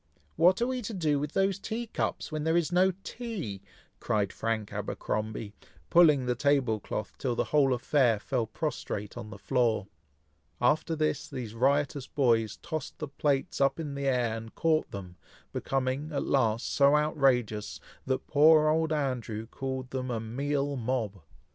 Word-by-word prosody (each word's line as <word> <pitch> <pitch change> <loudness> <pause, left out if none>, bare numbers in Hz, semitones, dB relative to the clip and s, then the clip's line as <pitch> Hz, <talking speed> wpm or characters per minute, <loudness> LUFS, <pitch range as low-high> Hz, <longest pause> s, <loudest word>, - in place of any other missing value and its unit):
"What 185 +7 +4
are - - +3
we 255 0 -2
to 220 -1 -5
do 155 -5 +1
with 150 +1 -4
those 195 0 +1
tea 230 +3 -4
cups, 220 - -3
when 155 -1 -2
there 160 +2 +2
is 170 0 0
no 185 +2 +4
tea?" 200 - -5 0.4
cried 100 -2 0
Frank 110 -2 -2
Abercromby, 105 -1 -3 0.4
pulling 150 -6 +6
the 125 - +1
table 130 -4 +2
cloth 105 +1 -5
till 125 -3 -1
the - - +1
whole 140 -3 +5
affair 125 -2 +3
fell 120 0 -1
prostrate 105 -7 -4
on 120 -3 -7
the 105 - -9
floor. 115 -1 +1 0.7
After 155 +6 +2
this, 155 -1 -1
these 115 -4 -6
riotous 140 +2 +1
boys 115 -6 +1
tossed 155 -2 -5
the 155 - -4
plates 140 -1 0
up 135 +3 +3
in 150 -3 -4
the 140 0 -2
air, 125 -4 +1
and 115 0 -8
caught 160 -1 +1
them, 90 -3 -8 0.4
becoming, 135 +3 -1
at 140 - -2
last, 115 -4 +1
so 140 +1 +5
outrageous, 130 -8 +1 0.3
that 130 0 -1
poor 155 +1 +6
old 160 +1 +1
Andrew 125 -7 -2
called 130 +1 -5
them 130 -1 -3
a 120 -2 -1
"meal 140 +5 -1
mob." 115 -6 -2
135 Hz, 165 wpm, -29 LUFS, 115-155 Hz, 0.7 s, pulling